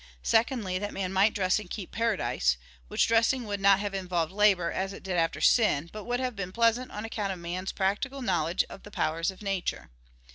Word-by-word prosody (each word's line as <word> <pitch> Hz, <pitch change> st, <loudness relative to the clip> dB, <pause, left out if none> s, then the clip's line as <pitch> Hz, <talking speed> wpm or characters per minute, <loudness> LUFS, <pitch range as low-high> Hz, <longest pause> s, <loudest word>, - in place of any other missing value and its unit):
Secondly, 225 Hz, -5 st, +1 dB
that 205 Hz, +1 st, -4 dB
man 190 Hz, -1 st, -2 dB
might 200 Hz, +3 st, +3 dB
dress 185 Hz, 0 st, +2 dB
and 210 Hz, -, -10 dB
keep 195 Hz, -3 st, -6 dB
paradise, 195 Hz, -, +1 dB, 0.3 s
which -, -, +2 dB
dressing 230 Hz, +3 st, +3 dB
would 205 Hz, -1 st, -3 dB
not 195 Hz, 0 st, +6 dB
have 205 Hz, -1 st, -3 dB
involved 180 Hz, -4 st, -1 dB
labor, 195 Hz, -4 st, +3 dB
as 195 Hz, +1 st, -2 dB
it -, -, -10 dB
did 190 Hz, -1 st, -3 dB
after 165 Hz, -1 st, +1 dB
sin; 170 Hz, -, +3 dB
but 215 Hz, -1 st, -7 dB
would 245 Hz, 0 st, -1 dB
have 255 Hz, -2 st, -2 dB
been 185 Hz, -2 st, -4 dB
pleasant 230 Hz, +4 st, +2 dB
on 210 Hz, +1 st, -6 dB
account 210 Hz, -3 st, -3 dB
of 190 Hz, -, -4 dB
man's 180 Hz, +2 st, -4 dB
practical 230 Hz, +8 st, -1 dB
knowledge 170 Hz, -4 st, +1 dB
of -, -, -11 dB
the -, -, -12 dB
powers 165 Hz, -3 st, -1 dB
of 190 Hz, +2 st, -8 dB
nature. 195 Hz, -, -3 dB
195 Hz, 210 wpm, -28 LUFS, 180-220 Hz, 0.3 s, not